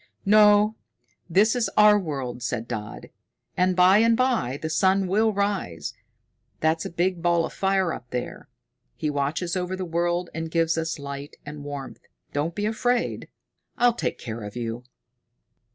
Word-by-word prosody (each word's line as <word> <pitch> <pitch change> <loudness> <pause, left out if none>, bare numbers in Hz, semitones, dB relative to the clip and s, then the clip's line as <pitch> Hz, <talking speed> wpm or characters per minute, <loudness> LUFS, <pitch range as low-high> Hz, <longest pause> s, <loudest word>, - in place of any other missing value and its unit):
"No, 210 +1 +6 0.6
this 205 +8 +4
is 240 -2 0
our 210 0 +7
world," 135 -8 -4
said 120 -1 -3
Dodd. 105 -3 -6 0.4
"And 185 0 +2
by 185 +3 +6
and 230 0 +4
by 240 - +1
the 160 - -3
sun 190 +4 +2
will 215 +4 +2
rise, 200 - -2 0.7
that's 160 +1 +1
a - - -3
big 175 +1 -1
ball 170 -1 +2
of - - -8
fire 190 -3 +1
up 125 - -9
there. 125 0 -5 0.5
He 150 - -2
watches 150 +5 -1
over 180 0 -2
the 185 0 -4
world 175 +1 -1
and 160 0 -4
gives 165 0 +1
us 165 0 -2
light 140 0 -7
and 145 0 -8
warmth. 140 -2 -7 0.3
Don't 155 +4 -1
be 205 - -1
afraid. 240 +3 0 0.5
I'll 240 0 +4
take - - -3
care 115 -1 -6
of 105 +1 -8
you." 120 0 -4
170 Hz, 160 wpm, -25 LUFS, 145-200 Hz, 0.7 s, our